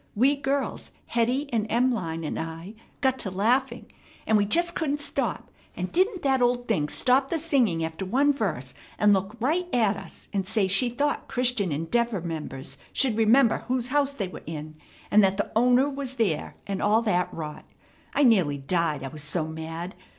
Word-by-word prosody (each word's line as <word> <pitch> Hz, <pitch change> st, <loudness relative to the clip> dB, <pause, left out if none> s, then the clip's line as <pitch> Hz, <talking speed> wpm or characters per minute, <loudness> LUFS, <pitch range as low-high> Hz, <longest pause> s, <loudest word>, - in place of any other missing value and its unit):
We 265 Hz, +7 st, +4 dB
girls, 280 Hz, 0 st, -2 dB, 0.2 s
Hetty 245 Hz, +5 st, 0 dB
and 220 Hz, -2 st, +1 dB
Em'line 225 Hz, -10 st, 0 dB
and -, -, -3 dB
I, 165 Hz, +4 st, -6 dB, 0.3 s
got 265 Hz, -1 st, +2 dB
to 195 Hz, -, -4 dB
laughing, 235 Hz, +8 st, +1 dB, 0.4 s
and 220 Hz, -, +3 dB
we 205 Hz, -1 st, +4 dB
just 340 Hz, +10 st, +1 dB
couldn't 295 Hz, -3 st, -1 dB
stop; 290 Hz, -, -3 dB, 0.3 s
and 180 Hz, 0 st, -3 dB
didn't 375 Hz, +1 st, +1 dB
that 265 Hz, -2 st, +2 dB
old 245 Hz, 0 st, +1 dB
thing 155 Hz, -10 st, 0 dB
stop 265 Hz, +2 st, +2 dB
the 335 Hz, -, 0 dB
singing 250 Hz, -, +1 dB
after 160 Hz, +3 st, -5 dB
one 275 Hz, +9 st, +2 dB
verse, 155 Hz, -, -3 dB, 0.2 s
and 210 Hz, -1 st, +5 dB
look 195 Hz, +3 st, -1 dB
right 320 Hz, +9 st, 0 dB
at 215 Hz, -5 st, +2 dB
us, -, -, -11 dB
and 195 Hz, -2 st, -1 dB
say 215 Hz, -2 st, +2 dB
she 195 Hz, +6 st, +3 dB
thought 285 Hz, +5 st, -1 dB
Christian 245 Hz, -7 st, 0 dB
Endeavor 200 Hz, +9 st, 0 dB
members 155 Hz, -5 st, -5 dB
should 260 Hz, -6 st, +2 dB
remember 225 Hz, +2 st, +4 dB
whose 250 Hz, -1 st, -1 dB
house 280 Hz, 0 st, +1 dB
they 200 Hz, -7 st, -2 dB
were 185 Hz, -, -9 dB
in, 155 Hz, -1 st, -6 dB, 0.4 s
and 210 Hz, 0 st, +6 dB
that 195 Hz, 0 st, +2 dB
the 205 Hz, -, -2 dB
owner 250 Hz, +4 st, +4 dB
was 275 Hz, -2 st, -4 dB
there, 200 Hz, -11 st, -1 dB
and 195 Hz, -1 st, -3 dB
all 215 Hz, +3 st, +3 dB
that 180 Hz, -5 st, +1 dB
rot. 155 Hz, -2 st, -7 dB, 0.5 s
I 290 Hz, -, +4 dB
nearly 185 Hz, -, +4 dB
died, 150 Hz, 0 st, -1 dB
I 135 Hz, -, -4 dB
was 155 Hz, 0 st, -8 dB
so 155 Hz, +2 st, -2 dB
mad. 160 Hz, +3 st, -6 dB
220 Hz, 185 wpm, -26 LUFS, 175-260 Hz, 0.5 s, and